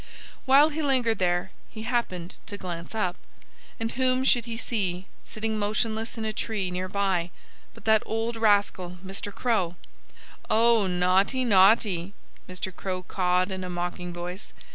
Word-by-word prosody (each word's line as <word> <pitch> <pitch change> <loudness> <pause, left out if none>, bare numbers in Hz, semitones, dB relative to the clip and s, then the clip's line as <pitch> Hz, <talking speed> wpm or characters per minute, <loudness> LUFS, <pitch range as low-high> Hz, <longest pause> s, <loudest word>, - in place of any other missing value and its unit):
While 275 +3 +6
he 315 +1 -3
lingered 255 -6 +2
there 180 +1 +1 0.2
he 220 - -8
happened 225 -8 -2
to 205 - -5
glance 175 +1 -6
up. 185 -5 -1 0.6
And 225 0 -2
whom 255 0 +1
should 240 -3 +3
he 230 -1 -5
see, 190 -7 -2 0.2
sitting 220 0 -3
motionless 220 +2 -1
in 220 - -3
a 215 - -2
tree 205 -6 -2
near 185 +1 -3
by, 190 -3 0 0.5
but 230 - -15
that 220 -1 +5
old 225 +1 -2
rascal, 200 -5 +2
Mr. 195 +2 -4
Crow! 200 -7 0 0.7
"Oh! 225 -2 +4
Naughty, 185 +8 +2
naughty!" 195 -3 +4 0.3
Mr. 185 0 -5
Crow 185 -1 -4
cawed 180 +1 +1
in 190 0 -4
a 180 - -5
mocking 180 0 -4
voice. 175 +3 -7
200 Hz, 150 wpm, -26 LUFS, 180-225 Hz, 0.7 s, While